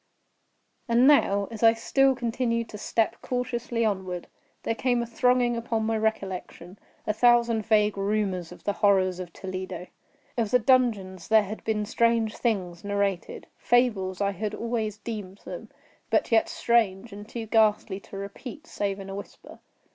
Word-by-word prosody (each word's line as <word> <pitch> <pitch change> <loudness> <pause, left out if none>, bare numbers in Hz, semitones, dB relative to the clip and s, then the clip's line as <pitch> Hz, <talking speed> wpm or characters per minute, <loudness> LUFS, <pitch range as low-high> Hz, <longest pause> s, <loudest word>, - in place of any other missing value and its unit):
And 235 +1 +4
now, 200 -9 +4
as 225 - -7
I 225 -1 +7
still 270 +4 +2
continued 230 -1 -1
to 210 - -8
step 225 +1 0
cautiously 240 -2 -2
onward, 185 -4 -2 0.4
there - - 0
came 245 0 0
thronging 245 +1 +2
upon 230 -1 -2
my 225 0 0
recollection 195 -4 -3 0.3
a 215 - 0
thousand 235 -1 +3
vague 210 -2 +3
rumors 195 -4 -1
of 180 - -13
the 205 - 0
horrors 190 -3 +2
of 180 -2 -6
Toledo. 185 -1 -6 0.5
Of 225 -3 +1
the 250 - +5
dungeons 215 -8 +1
there 220 -1 +5
had 210 +2 -7
been 215 -1 -1
strange 230 0 +1
things 185 -7 -2
narrated—fables 200 +1 0
I 200 0 +2
had 210 +2 -4
always 225 -3 -2
deemed 210 -4 -7
them—but - - -4
yet 225 -1 +4
strange, 225 -2 +1
and 205 +2 -10
too 230 -2 -5
ghastly 215 -3 +2
to 195 - -11
repeat, 220 +10 -8
save 200 -9 -3
in 195 - -8
a 195 - -6
whisper. 200 +1 -10
215 Hz, 150 wpm, -26 LUFS, 195-235 Hz, 0.5 s, I